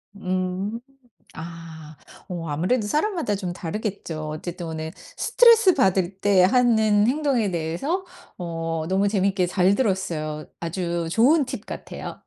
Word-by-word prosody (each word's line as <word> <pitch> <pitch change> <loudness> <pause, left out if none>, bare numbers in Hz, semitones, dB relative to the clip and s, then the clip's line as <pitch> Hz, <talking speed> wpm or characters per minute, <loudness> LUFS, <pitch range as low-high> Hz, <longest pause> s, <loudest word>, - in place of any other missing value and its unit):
음. 185 +3 -2 0.5
아 160 -2 -9 0.3
어 170 -3 -5
아무래도 185 +10 0
사람마다 310 - 0
좀 185 -3 -4
다르겠죠. 170 -4 -4
어쨌든 170 +3 -6
오늘 160 0 -5
스트레스 460 -5 +4
받을 190 -5 +1
때 195 -2 +4
하는 220 -1 +4
행동에 265 -6 +1
대해서 175 - -2 0.3
어 165 -2 -3
너무 195 +2 +2
재밌게 195 -2 +1
잘 185 +2 +3
들었어요. 165 -9 -1
아주 170 0 -2
좋은 275 - +4
팁 - - -6
같아요. - - -7
185 Hz, 270 characters per minute, -24 LUFS, 165-220 Hz, 0.5 s, 스트레스